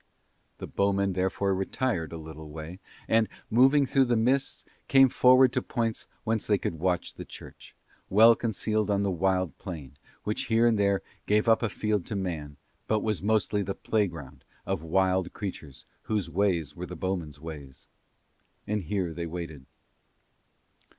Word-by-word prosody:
The - - -6
bowmen 100 -1 +1
therefore 95 +1 0
retired 95 - -1
a 85 - -6
little 80 -1 -9
way 80 +4 -8 0.3
and, 115 -1 +3 0.2
moving 135 +5 +5
through 135 +1 +3
the 120 -1 +1
mists, 130 +4 +1 0.2
came 135 -1 +6
forward 130 0 +5
to - - +1
points 115 -3 -2 0.2
whence 110 -1 -1
they 105 - +3
could 80 -4 -4
watch 90 +1 0
the - - -8
church, - - -12 0.3
well 115 +4 +7
concealed 110 -2 -1
on 100 0 +2
the 100 - 0
wild 95 0 0
plain, 70 -7 -8 0.2
which 105 - -2
here 115 0 +3
and 115 -3 +3
there 100 -1 +2 0.2
gave 105 +2 +2
up 115 -1 +5
a 115 - 0
field 105 -2 -1
to - - -4
man 80 -7 -4 0.3
but 110 -1 +1
was 105 -2 0
mostly 105 0 +1
the 95 0 -3
playground 80 - -2 0.2
of 95 -4 -2
wild 95 +2 +1
creatures 80 -9 -7 0.2
whose 100 -6 -1
ways 85 -6 0
were 90 +1 -6
the 90 - -7
bowmen's 85 -5 -3
ways. 75 -4 -9 0.8
And 105 0 -1
here 90 -1 -2
they 85 +1 -4
waited. 80 -5 -7
95 Hz, 160 wpm, -28 LUFS, 85-110 Hz, 0.8 s, well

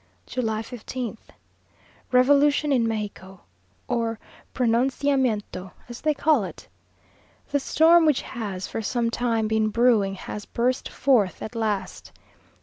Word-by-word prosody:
July 225 -3 -2
15th. 240 -1 -7 0.8
Revolution 285 +3 +4
in 240 -4 +3
Mexico! 200 -4 -5 0.5
or 230 -2 -1 0.3
Pronunciamiento, 245 -5 0
as 240 0 -9
they 305 -1 +1
call 295 -6 +3
it. 190 - -9 0.8
The 285 - +2
storm 325 +4 +5
which 295 -4 +2
has 200 -6 -5
for 225 - -4
some 230 +1 -1
time 230 -2 0
been 220 0 +1
brewing, 215 -4 +3
has 205 +2 -7
burst 250 +2 -1
forth 230 -9 +1
at 220 - -6
last. 215 -4 -3
235 Hz, 120 wpm, -24 LUFS, 215-260 Hz, 0.8 s, storm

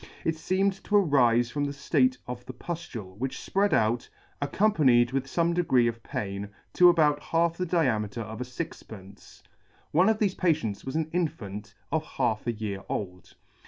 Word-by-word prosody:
It 160 - +1
feemed 190 +4 +1
to 210 - 0
arife 125 - +4
from 145 -1 -1
the 140 - -2
ftate 255 - +1
of 125 0 -6
the 130 - -6
puftule, 120 - -7
which 130 +1 -3
fpread 200 +1 0
out, 115 +2 +1 0.3
accompanied 140 - +3
with 135 0 -1
fome 170 +3 +1
degree 165 -9 +3
of 115 0 -3
pain, 100 -1 -4 0.2
to 180 0 +7
about 150 -4 +3
half 165 0 +1
the 180 +1 -3
diameter 115 - 0
of 110 +2 -7
a - - -2
fixpence. 110 - -9 0.5
One 180 +7 +4
of 220 - +2
thefe 205 -3 0
patients 155 - 0
was 130 - -5
an 160 -1 0
infant 105 - -3 0.2
of 160 -1 +1
half 120 -7 -2
a - - +2
year 105 -3 -5
old. 90 -3 -5
135 Hz, 170 wpm, -27 LUFS, 110-170 Hz, 0.5 s, to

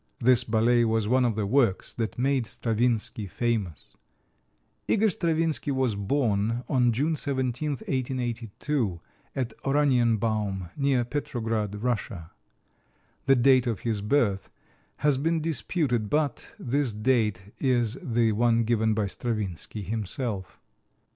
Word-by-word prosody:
This 125 0 +4
ballet 120 +1 +3
was 110 -2 +1
one 130 +3 +3
of 120 -3 +1
the 105 -1 -1
works 115 -3 +1
that 115 -2 -3
made 130 -2 +1
Stravinsky 115 -2 -1
famous. 105 -4 -3 0.9
Igor 220 -1 +3
Stravinsky 165 -3 0
was 130 -4 +1
born 110 +1 0
on 125 -4 +3
June 145 +8 0
17, 135 0 -2
1882, 125 - -2 0.4
at 125 -4 -2
Oranienbaum, 115 -9 +1
near 140 -3 +2
Petrograd, 110 -6 -3
Russia. 105 -8 -2 1.0
The 135 - +6
date 130 0 +4
of 115 -4 -2
his 110 -3 -1
birth 105 -4 +1 0.5
has 145 -3 +2
been 165 +3 +1
disputed, 145 - -1
but 150 -3 -1
this 135 -1 -1
date 105 -4 0
is 120 -4 +1
the 115 -2 +1
one 115 +1 +3
given 110 -1 +1
by 105 -1 +1
Stravinsky 105 -2 -4
himself. 105 -1 -4
120 Hz, 120 wpm, -27 LUFS, 110-135 Hz, 1.0 s, The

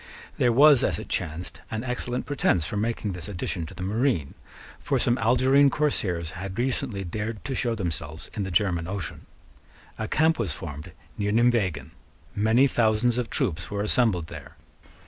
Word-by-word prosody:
There 120 - +4
was, 140 +2 +6
as - - +1
it - - -8
chanced, 80 +3 -4
an 110 +1 -3
excellent 125 0 -3
pretence 95 - +1
for - - -4
making 110 -1 -1
this 90 -1 -5
addition 90 -3 -4
to - - -11
the 90 - -6
marine: 105 - 0 0.5
for - - 0
some 120 - +2
Algerine 130 +5 +4
corsairs 95 - -1
had 95 +2 -6
recently 120 -5 -1
dared 105 +4 -5
to 135 - -2
show 120 -2 0
themselves 80 -5 -4
in 105 - -3
the 95 - -2
German 85 -2 +1
Ocean. 95 -4 -5 0.7
A 110 - -2
camp 160 +4 +2
was 100 -10 0
formed 75 +3 -7 0.3
near 105 0 0
Nimeguen. 105 - +1 0.4
Many 110 +6 +4
thousands 120 -1 +2
of 120 - -3
troops 85 -1 -1
were 100 0 -2
assembled 105 -6 +2
there. - - -11
105 Hz, 165 wpm, -26 LUFS, 90-120 Hz, 0.7 s, was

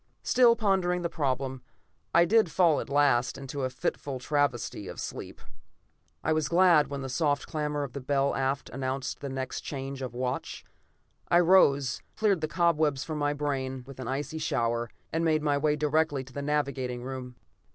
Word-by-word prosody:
Still 240 -2 +5
pondering 190 -5 +1
the 170 - 0
problem, 130 -4 -2 0.5
I 170 +1 +5
did 215 0 +4
fall 165 0 +3
at - - -6
last 140 -3 +2
into 135 +1 -5
a 130 - 0
fitful 130 +1 -3
travesty 125 -7 -1
of - - -7
sleep. - - -6 0.8
I 160 - +2
was 155 -2 0
glad 170 -4 +5
when 140 -1 -5
the - - -4
soft 145 +2 0
clamor 150 -2 -2
of 130 -3 -6
the 140 - -5
bell 140 +1 +1
aft 135 +1 -1
announced 135 +1 -3
the 140 - -5
next 130 -1 -4
change 135 -1 -5
of 125 -2 -5
watch. 125 0 -3 0.6
I 175 - +5
rose, 145 -8 +4
cleared 205 -6 +2
the 155 - 0
cobwebs 155 -4 +1
from 155 -2 -4
my 145 0 +1
brain 135 -3 -3
with 135 -1 -12
an 130 - -5
icy 145 +4 -3
shower, 120 -6 0 0.2
and 165 +1 0
made 155 -2 +2
my 145 -1 +2
way 150 0 +2
directly 150 -2 +1
to 130 0 -15
the 140 - -4
navigating 140 -4 -1
room. 130 -1 -6
140 Hz, 180 wpm, -28 LUFS, 130-155 Hz, 0.8 s, Still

